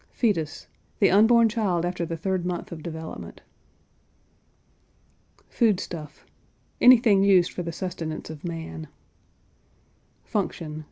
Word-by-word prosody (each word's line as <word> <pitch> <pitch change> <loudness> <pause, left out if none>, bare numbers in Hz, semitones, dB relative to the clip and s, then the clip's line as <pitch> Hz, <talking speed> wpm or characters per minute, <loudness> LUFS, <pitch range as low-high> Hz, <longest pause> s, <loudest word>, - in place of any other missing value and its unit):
FETUS. 165 - -1 0.3
The 200 - +4
unborn 225 +4 +6
child 200 -7 0
after 175 -1 -3
the 165 - -4
third 185 +1 -1
month 180 -1 -4
of 165 -2 -7
development. 160 0 -8 2.0
FOOD 220 -6 +2
STUFF. 150 -4 -8 0.6
Anything 230 -5 +6
used 185 -3 +4
for - - -5
the 170 -1 -4
sustenance 165 -3 -5
of 155 -2 -11
man. 165 -2 -6 1.4
FUNCTION. 155 -2 -3
175 Hz, 110 wpm, -25 LUFS, 160-200 Hz, 2.0 s, unborn